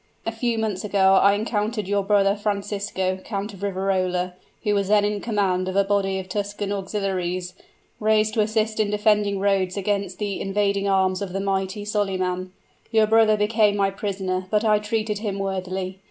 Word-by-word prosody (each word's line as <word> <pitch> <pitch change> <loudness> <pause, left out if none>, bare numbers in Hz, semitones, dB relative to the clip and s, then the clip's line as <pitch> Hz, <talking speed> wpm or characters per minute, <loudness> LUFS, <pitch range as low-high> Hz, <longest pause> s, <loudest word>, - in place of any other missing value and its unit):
A 225 - -1
few 230 0 -1
months 215 -4 -2
ago 195 -2 +3
I 200 0 +5
encountered 210 -1 -2
your 200 0 +1
brother 200 0 +3
Francisco, 200 -2 -2
Count 205 0 -4
of 195 - -12
Riverola, 185 -2 -1 0.3
who 210 - +1
was 200 -1 +1
then 205 0 +4
in 205 -1 -1
command 195 -5 0
of 185 - -3
a 200 - +4
body 195 -1 0
of 190 -1 -5
Tuscan 205 +1 -3
auxiliaries, 185 -3 -2 0.5
raised 215 0 +2
to 220 - -1
assist 220 +1 0
in 215 -1 +2
defending 210 -1 +2
Rhodes 195 -1 +1
against 200 -2 -1
the 205 -2 -3
invading 200 0 0
arms 190 -1 +2
of 190 -3 -4
the 195 - -1
mighty 195 +1 -2
Solyman. 185 -3 -1 0.4
Your 220 -2 +4
brother 220 0 +4
became 210 0 +2
my 195 -1 +2
prisoner, 190 -2 -3
but 215 +2 +1
I 210 -1 +4
treated 210 0 -2
him 205 -3 -3
worthily. 190 -1 -3
200 Hz, 175 wpm, -23 LUFS, 190-210 Hz, 0.5 s, I